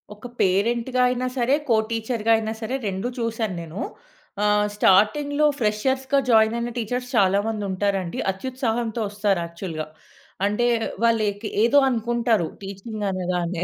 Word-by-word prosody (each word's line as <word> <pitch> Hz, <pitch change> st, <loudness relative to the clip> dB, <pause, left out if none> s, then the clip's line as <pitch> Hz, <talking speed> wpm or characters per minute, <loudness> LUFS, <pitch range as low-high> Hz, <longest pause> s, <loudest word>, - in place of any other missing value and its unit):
ఒక 210 Hz, +4 st, -9 dB
పేరెంట్‌గా 235 Hz, +7 st, +1 dB
అయినా 250 Hz, 0 st, -1 dB
సరే, 250 Hz, +3 st, +3 dB
కో 230 Hz, -, +5 dB
టీచర్‌గా 230 Hz, 0 st, -1 dB
అయినా 220 Hz, 0 st, -3 dB
సరే 225 Hz, +4 st, -2 dB
2 195 Hz, +4 st, -2 dB
చూసాను 225 Hz, -4 st, -2 dB
నేను. 165 Hz, +4 st, -7 dB, 0.6 s
ఆహ్, 210 Hz, 0 st, +3 dB
స్టార్టింగ్‌లో 285 Hz, +10 st, +3 dB
ఫ్రెషర్స్‌గా 265 Hz, +5 st, +1 dB
జాయిన్ 220 Hz, 0 st, +5 dB
అయిన 235 Hz, 0 st, -3 dB
టీచర్స్ 245 Hz, +2 st, -3 dB
చాలా 195 Hz, -2 st, +4 dB
మందుంటారండి 200 Hz, -4 st, -2 dB
అత్యుత్సాహంతో 235 Hz, +1 st, -2 dB
ఒస్తారు 205 Hz, -3 st, 0 dB
యాక్చువల్‌గా. 170 Hz, -2 st, -6 dB, 0.6 s
అంటే 210 Hz, +4 st, 0 dB, 0.4 s
వాళ్ళుకి 215 Hz, -2 st, +1 dB, 0.2 s
ఏదో 235 Hz, +5 st, +4 dB
అనుకుంటారు 235 Hz, -5 st, +1 dB, 0.2 s
టీచింగ్ 200 Hz, +3 st, -6 dB
అనగానే. 180 Hz, -1 st, -2 dB
220 Hz, 125 wpm, -23 LUFS, 195-240 Hz, 0.6 s, కో